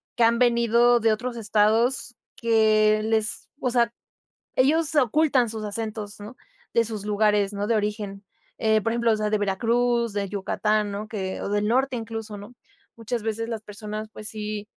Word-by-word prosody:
que 235 - +2
han 230 +1 +4
venido 235 0 +4
de 225 0 +3
otros 240 +2 -4
estados, 225 +4 +1 0.2
que 215 -2 +3
les 220 -1 0
o 255 - 0
sea, 235 -1 +2 0.6
ellos 310 +4 +2
ocultan 275 -1 +3
sus 220 -1 -5
acentos, 210 0 -5
¿no?, 210 +5 -9 0.4
de 230 - +4
sus 215 -2 -5
lugares, 210 -1 +2
¿no?, 205 0 -3
de 230 - +2
origen. 205 -1 -3 0.3
Eh, 220 -1 +2
por 225 - -1
ejemplo, 235 -1 +2
o - - +3
sea 215 0 -1
de 215 - +1
Veracruz, 235 +3 +1
de 200 -1 -2
Yucatán, 210 +1 0
¿no?, 205 +2 -5
que 190 -4 -4
o - - -3
del 205 0 0
norte, 260 +3 +1
incluso, 225 -2 -6
¿no?, 205 +4 -11 0.4
muchas 230 +1 -4
veces 225 +1 -2
las 225 -2 -4
personas, 215 +1 -7
pues 215 - -6
sí 210 -1 -4
220 Hz, 175 wpm, -24 LUFS, 210-235 Hz, 0.6 s, han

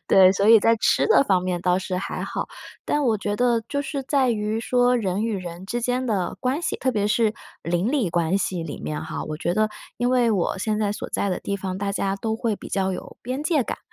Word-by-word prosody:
对， 190 -1 +7
所 195 +1 +1
以 225 -1 +8
在 230 +2 +4
吃 - - +2
的 445 - +5
方 185 -6 +2
面 180 -1 -2
倒 180 0 +2
是 185 -1 -3
还 185 - -4
好。 - - -3 0.4
但 295 - 0
我 230 -4 +3
觉 205 0 -2
得 240 -1 +2
就 285 - -1
是 275 0 -4
在 265 -1 +2
于 215 0 -1
说 245 +1 +3
人 200 -2 -1
与 225 -1 -1
人 180 -1 -7
之 240 +4 -2
间 250 +2 0
的 200 -7 -1
关 260 +5 0
系， 345 - -2
特 260 -1 0
别 205 -2 0
是 215 0 +2 0.3
邻 175 +6 0
里 260 - +1
关 170 +2 +1
系 190 -3 -1
里 165 - -6
面 150 - -4
哈， 160 - -5
我 155 - -5
觉 170 +3 -1
得 215 +1 +2 0.3
因 245 0 +1
为 245 -2 +3
我 195 -3 0
现 215 +2 -1
在 205 -1 0
所 - - -6
在 200 - 0
的 180 - -2
地 200 - -2
方， 190 -1 -4
大 200 0 -1
家 195 -1 -1
都 220 +2 -2
会 225 -1 -1
比 - - -10
较 190 -1 0
有 - - -8
边 255 +4 -3
界 305 -4 +2
感。 - - -5
210 Hz, 265 characters per minute, -24 LUFS, 185-245 Hz, 0.4 s, 以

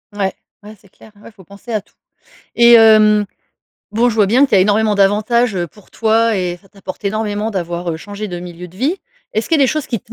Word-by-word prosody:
Ouais. 195 -2 -1 0.3
Ouais, 210 +1 -12
c'est 200 - -23
clair. 220 - -19
Ouais, - - -13
faut 200 -3 -18
penser 200 +6 -12
à 215 -2 -1
tout. - - -33 0.6
Et 235 0 +6
hem, 215 -2 +6 0.7
bon, 235 +3 +2
je 235 - -2
vois 210 -2 +3
bien 245 +8 +4
qu'il - - -1
y - - +5
a - - +5
énormément 210 +2 +2
d'avantages, 215 +4 +2
heu, 175 -2 -2
pour 210 +4 -21
toi, 225 0 +1
et 180 -2 -2
ça 195 - -24
t'apporte 200 0 -10
énormément, 210 +1 -2
d'avoir, 175 -3 -4
heu, - - -4
changé 205 +5 -7
de 175 -2 -6
milieu 175 0 -9
de 180 - -19
vie. 285 - -1 0.4
Est-ce 220 - -2
qu'il 325 - +2
y - - +1
a - - +5
des - - +3
choses 305 0 -2
qui 230 -5 -3
te 225 - -17
210 Hz, 250 wpm, -16 LUFS, 195-225 Hz, 0.7 s, Et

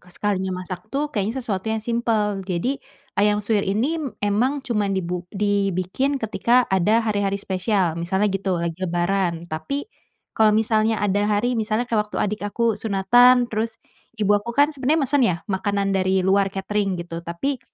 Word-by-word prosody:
K 180 - -21
sekalinya 190 -3 -2
masak 180 +2 -8
tuh 290 +4 -2
kayaknya 225 +4 -2
sesuatu 200 -2 -2
yang 220 0 -1
simpel, 220 -4 0
jadi 190 +9 -2 0.4
ayam 210 0 +2
suwir 210 -1 +2
ini 255 +12 0 0.2
emang 250 +8 0
cuman 205 -5 0
dibu 180 -1 -3
dibikin 200 +6 0
ketika 240 +1 +2
ada 210 +5 +3
hari-hari 205 -2 0
spesial 190 -2 0
misalnya 190 +4 0
gitu, 195 -2 -1
lagi 170 +1 -3
lebaran, 175 -1 0
tapi 175 - -4 0.5
kalo 215 -1 +4
misalnya 220 0 +2
ada 205 +1 +1
hari 215 +4 +1
misalnya 220 0 0
kek 230 -3 +1
waktu 210 0 -5
adik 210 +1 -1
aku 225 0 0
sunatan 245 +5 +5
terus 220 +1 -2 0.4
ibu 205 -2 +2
aku 220 +4 -1
kan 290 +2 +4
sebenarnya 290 +3 +1
mesen 280 +2 +1
ya 180 - +1
makanan 200 0 -1
dari 190 -1 +1
luar 195 +1 +3
katering 195 0 -2
gitu, 170 -1 -6
tapi 170 +11 -3
205 Hz, 160 wpm, -22 LUFS, 190-230 Hz, 0.5 s, sunatan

